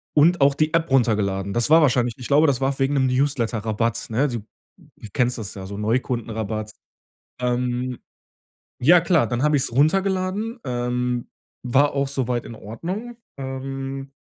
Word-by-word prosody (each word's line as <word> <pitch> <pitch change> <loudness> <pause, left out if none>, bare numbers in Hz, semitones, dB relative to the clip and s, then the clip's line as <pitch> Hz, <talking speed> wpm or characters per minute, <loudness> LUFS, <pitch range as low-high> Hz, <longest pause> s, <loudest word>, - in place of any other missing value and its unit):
und 165 +2 +4
auch 140 0 +5
die 155 +2 0
App 165 -2 +1
runtergeladen. 100 -6 +1
Das 120 +3 0
war 160 +1 +7
wahrscheinlich 125 -4 +2
ich 125 - -7
glaube, 150 +3 +4
das 135 -3 +1
war 135 0 0
wegen 135 +2 +1
'nem 130 -1 +3
Newsletterrabatt, 115 -3 0
ne? 125 +6 +1
Du 120 -4 -3 0.7
kennst 125 0 +1
das 105 -4 -6
ja, 95 -1 -7
so 100 +1 -7
Neukundenrabatt. 110 -1 -2 0.7
Ähm, 125 0 -1 0.8
ja, 170 +6 +6
klar, 165 -8 +2
dann 120 +5 -1
habe 150 0 +3
ich's 130 - -1
runtergeladen, 190 - +1
ähm, 125 0 -2 0.3
war 135 +4 +3
auch 140 0 0
soweit 125 -3 -2
in 115 - -8
Ordnung. 185 - -6 0.2
Ähm, 135 0 -5
130 Hz, 150 wpm, -23 LUFS, 120-145 Hz, 0.8 s, war